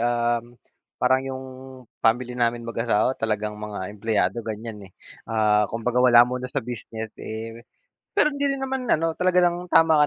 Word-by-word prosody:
um, 120 0 0 0.4
parang 130 0 +3
yung 130 0 -5 0.6
family 120 +2 +2
namin 120 -1 0
mag-asawa 115 0 +1
talagang 105 -1 -1
mga 105 -1 -5
empleyado 105 0 0
ganyan 110 -1 -6
eh. 90 - -28 0.4
Ah 105 -1 +3
kumbagaa 120 +2 -1
wala 120 -1 +8
muna 125 +1 -4
sa 135 -1 -3
business 110 -2 -6
eh, 115 +1 -6 0.5
pero 405 -7 +4
hindi 285 -1 -1
rin 275 -1 -1
naman 265 -1 -2
ano, 165 +1 -1
talaga 180 0 +3
ng 175 0 +1
tama 160 -3 +5
120 Hz, 155 wpm, -24 LUFS, 110-135 Hz, 0.6 s, wala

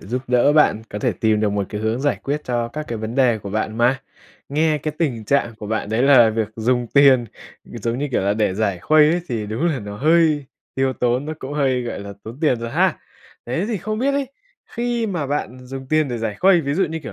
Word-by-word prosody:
giúp 125 +6 -4
đỡ 125 +4 +3
bạn 150 -7 +3
có 105 - -4
thể - - 0
tìm 110 -1 +1
được 105 - +2
một 100 -1 -1
cái 105 -1 -5
hướng 110 +3 -1
giải 145 +1 +1
quyết 150 +2 -3
cho 120 -1 -1
các 150 +5 -6
cái 115 -2 -4
vấn 110 +2 -5
đề 125 -5 +3
của 100 -1 -8
bạn 110 +2 -2
mà. 125 +2 +2 0.5
Nghe 155 +1 +1
cái 150 +1 -4
tình 125 -10 -1
trạng 120 -2 +1
của 105 -1 -9
bạn 110 -1 -2
đấy 110 +3 0
là 130 -5 +6
việc 110 -1 -1
dùng 120 +2 0
tiền, 135 -1 +5 0.5
ừ, - - -8
giống 115 +2 -1
như 145 0 -2
kiểu 110 - 0
là, 100 +1 +1
để 105 -4 0
giải 100 -3 -1
khuây 155 - +4
ấy 175 +1 +1
thì 110 -3 -3
đúng 115 +11 -1
là 150 -6 0
nó 105 -1 -7
hơi 155 +2 +3 0.3
tiêu 135 0 +1
tốn, 125 +3 0
nó 155 - -4
cũng 135 +2 -7
hơi, 135 -4 +1
gọi 120 - -5
là, 100 0 -7
tốn 115 +7 -10
tiền 140 -7 +2
rồi 115 0 -4
ha. - - +1 0.5
Thế 130 +10 -1
thì 225 -4 -2
không 215 +4 -4
biết 275 +3 +1
ấy, 280 -2 -1 0.5
khi 240 -1 -1
mà 175 -8 -2
bạn 135 -3 -3
dùng 135 0 -7
tiền 155 -2 +2
để 120 - -3
giải 110 -2 -3
khuây, 185 - +4
ví 140 -2 -2
dụ, 190 +3 +2
như 160 0 -4
kiểu 150 - -8
130 Hz, 255 wpm, -21 LUFS, 110-150 Hz, 0.5 s, là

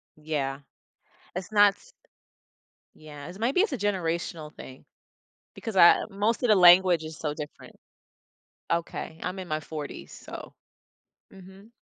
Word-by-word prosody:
Yeah, 145 -3 -3 0.8
it's 185 +2 -5
not 205 -1 +6
s - - -22 1.0
yes, 155 +4 -11
maybe 250 +10 +1
it's 415 -2 +2
a 265 - -2
generational 170 -6 -2
thing 130 0 -12 0.7
because 225 -4 -6
I 170 -2 +7
most 210 +5 0
of 245 - +2
the 215 - +6
language 180 -2 +6
is 155 0 -8
so 150 -2 -3
different. 150 -1 -9 1.0
Okay, 165 -1 -3
I'm 185 +1 -4
in 185 - -7
my 155 -2 -2
40s, 150 -1 -8
so - - -10 0.8
mhm. 190 +3 -15
175 Hz, 130 wpm, -27 LUFS, 155-200 Hz, 1.0 s, I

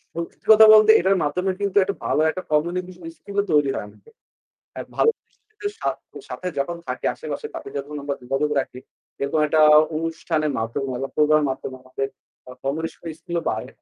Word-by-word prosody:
সত্যি 170 0 -7
কথা 220 0 +9
বলতে 215 0 +8
এটার 190 +2 +2
মাধ্যমে 180 +6 0
কিন্তু 200 0 -1
একটা 200 +1 -3
ভালো 155 - +1
একটা 185 +3 -4
কমিউনিকেশন 175 +3 -1
স্কিলও 200 0 -2
তৈরি 145 -2 +3
হয় - - -4
আমাদের। 280 - -19 0.7
এ - - -2 0.2
ভালো - - +5 0.2
কিছুর 420 0 -7
সাথে 185 - -5
যখন 170 +5 -2
থাকি 125 0 -4
আশেপাশে, 150 -2 -6
তাদের 135 - -8
যখন 145 +2 -6
আমরা 140 -1 -2
যোগাযোগ 135 +4 -1
রাখি 125 -1 -5 0.4
এরকম 140 +3 0
একটা 155 +1 +3 0.3
অনুষ্ঠানের 160 -1 -1
মাধ্যমে 115 +5 -3 0.2
বা 135 - -4
প্রোগ্রামের 150 -1 +3
মাধ্যমে 130 0 -6
আমাদের 130 +1 -4 0.4
আ - - -8
কমিউনিকেশন 160 +5 -4
স্কিলও 170 -1 -3
বাড়ে। 110 +3 -3
155 Hz, 165 wpm, -23 LUFS, 140-185 Hz, 0.7 s, কথা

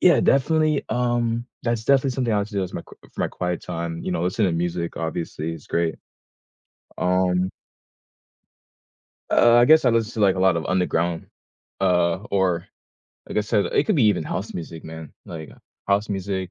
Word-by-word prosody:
yeah, 180 - +6
definitely 155 +2 +2
um, 120 -1 0 0.2
that's 115 -2 -1
definitely 135 -1 +3
something 125 -3 -1
I - - +2
like 100 +1 -2
to 105 - -12
do 100 - 0
as 90 - -9
my - - -4
qu - - -16 0.2
for - - -7
my - - +1
quiet 90 -1 -3
time, 85 -1 -4
you - - -3
know, 85 -1 -1
listen 105 +4 +1
to - - +1
music, 85 0 -2
obviously, 80 -1 -3
is 80 - -12
great, 85 -1 0 1.0
um 90 0 +2 1.8
Uh, 120 0 +5
I 120 0 +7
guess 155 +4 +6
I - - +5
listen 115 -1 0
to, 110 - -3
like, 95 -2 +4
a 95 - -3
lot 95 -2 +4
of 80 - -3
underground 85 -2 0 0.5
uh, 90 -2 +3 0.2
or, 90 -3 +1 0.6
like - - -1
I - - +4
said, 105 0 +1
it - - +1
could 215 - +1
be 130 - +4
even 105 -7 +2
house 100 +7 -4
music, 80 -1 -7
man, 80 -1 -9
like, 80 -3 -8 0.4
house 100 +2 +1
music, 95 -2 -3
95 Hz, 190 wpm, -23 LUFS, 85-115 Hz, 1.8 s, I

